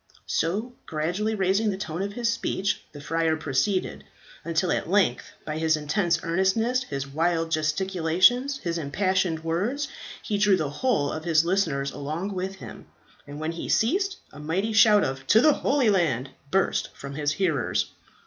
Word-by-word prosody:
So, 210 +9 -1
gradually 175 +8 -1
raising 195 +2 +1
the 195 - -2
tone 175 -3 -4
of 200 +1 -3
his 235 +1 -1
speech, 205 -3 -1
the 145 - -10
friar 165 +2 0
proceeded; 155 +6 -1 0.4
until 165 +2 0
at - - -1
length 190 -11 +1
by 155 0 -3
his 160 -1 +2
intense 165 +3 0
earnestness, 190 +9 +1
his 140 -1 -4
wild 165 +3 0
gesticulations, 185 - +2
his 170 -8 -3
impassioned 180 +1 0
words, 205 - -1 0.3
he 205 -1 -1
drew 205 -2 +4
the 150 -4 -2
whole 150 - 0
of 155 +1 -5
his 165 -1 +3
listeners 160 -7 0
along 160 +8 -4
with 190 +1 -3
him; 190 - -11 0.4
and 145 +1 -8
when 155 +1 -2
he 165 - -6
ceased, 380 - +1 0.2
a - - -11
mighty 185 +9 -1
shout 215 -1 +6
of 135 0 -4
"To 215 - +6
the 305 +4 +5
Holy 270 -7 +2
Land!" 140 - 0 0.2
burst 195 +4 +1
from 140 0 -8
his 145 0 -1
hearers. 155 -7 0
175 Hz, 165 wpm, -25 LUFS, 155-205 Hz, 0.4 s, shout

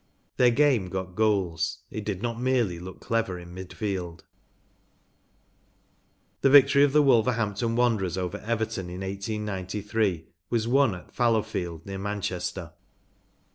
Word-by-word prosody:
Their 125 - +6
game 125 -6 +3
got 95 -1 -4
goals; 95 -6 0
it 110 - -5
did 100 -1 -4
not 120 0 -2
merely 120 -9 +1
look 90 +2 -9
clever 115 -5 -1
in 85 0 -11
mid 95 0 -8
field. 95 -6 -4 2.2
The 135 - +5
victory 140 0 +7
of 145 - +4
the 150 +1 +5
Wolverhampton 115 -3 +2
Wan¬ 120 -2 +3
derers 95 -1 -2
over 95 +2 -3
Everton 110 -5 -2
in 90 +2 -7
1893 100 -1 -2 0.2
was 115 -2 0
won 130 -4 +3
at 90 - -13
Fallowfield, 105 -9 0
near 95 0 -5
Manchester. 95 -4 -4
105 Hz, 135 wpm, -27 LUFS, 90-115 Hz, 2.2 s, victory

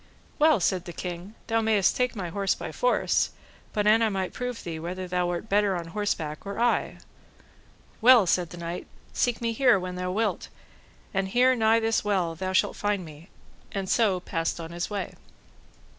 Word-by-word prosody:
Well, 305 -5 +5
said 180 0 0
the 175 - -7
king, 180 +4 -6
thou 225 0 +1
mayst 215 -3 +3
take 250 -1 0
my 185 -5 -4
horse 195 +2 0
by - - -6
force, - - +1 0.4
but 210 -1 -1
an 215 +2 +5
I 225 - +3
might 190 -2 -3
prove 250 -1 -4
thee 165 -2 -5
whether 180 +3 -5
thou 180 0 0
were 175 -1 -2
better 205 -2 +2
on 170 -1 -5
horseback 165 -6 -2
or 200 +2 -5
I.—Well, 240 -1 0
said 175 -1 +1
the 175 - -10
knight, 170 +1 -5 0.3
seek 245 -2 0
me 230 -1 0
here 245 -4 +4
when 180 0 -5
thou 180 0 -2
wilt, 215 +3 -1 0.6
and 195 -1 0
here 250 +5 +4
nigh 225 -1 +4
this 225 0 +1
well 190 -5 0
thou 185 +3 -3
shalt 190 - +1
find 205 -3 -1
me, 155 +3 -13 0.4
and 195 -1 -3
so 200 -3 +2
passed 165 -2 -2
on 165 0 -7
his 170 0 -3
way. 205 -2 -4
195 Hz, 185 wpm, -26 LUFS, 175-225 Hz, 0.6 s, Well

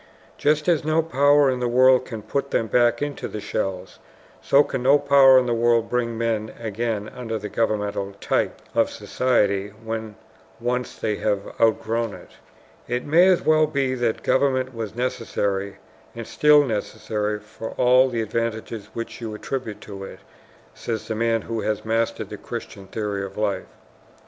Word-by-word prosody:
Just 150 +2 +2
as 170 -4 +3
no 155 +1 +2
power 145 -1 +4
in 130 - -2
the 125 - 0
world 130 +1 +5
can 110 -4 -7
put 140 +6 -2
them 115 - +1
back 120 +3 +2
into 145 -1 -4
the 105 - -6
shells, 95 -3 -4 0.4
so 140 +1 +5
can 135 - -4
no 135 +3 +5
power 140 -2 +6
in 130 - +4
the 120 - 0
world 115 0 +2
bring 120 -2 -1
men 110 -2 -1
again 110 -1 -3
under 115 -3 -5
the 105 0 -6
governmental 105 -2 -1
type - - -1
of - - +2
society 105 -6 0 0.2
when 110 -1 -5 0.4
once 125 +1 -2
they 105 -1 -2
have 100 -2 -2
outgrown 115 0 +1
it. - - -14 0.6
"It 120 +1 -2
may 175 +5 +5
well 155 -2 +3
be 140 -3 0
that 120 -3 -1
government 130 -1 +1
was 115 -2 -5
necessary 100 -5 -2 0.4
and 115 - -5
is - - -14
still 150 -1 +5
necessary 105 -2 -2
for 105 +1 -8
all 125 +1 +5
the 115 -2 -1
advantages 110 -1 -3
which 115 +1 -6
you 110 -2 -5
attribute 115 -1 -5
to 100 -2 -8
it," - - -10 0.5
says 110 -2 -5
the - - -2
man 115 -1 +1
who 115 -1 -3
has 110 0 -2
mastered 115 +1 -1
the - - -7
Christian 95 -1 -8
theory 105 -1 -3
of 95 0 -8
life. 105 -2 -1
115 Hz, 170 wpm, -23 LUFS, 110-130 Hz, 0.6 s, power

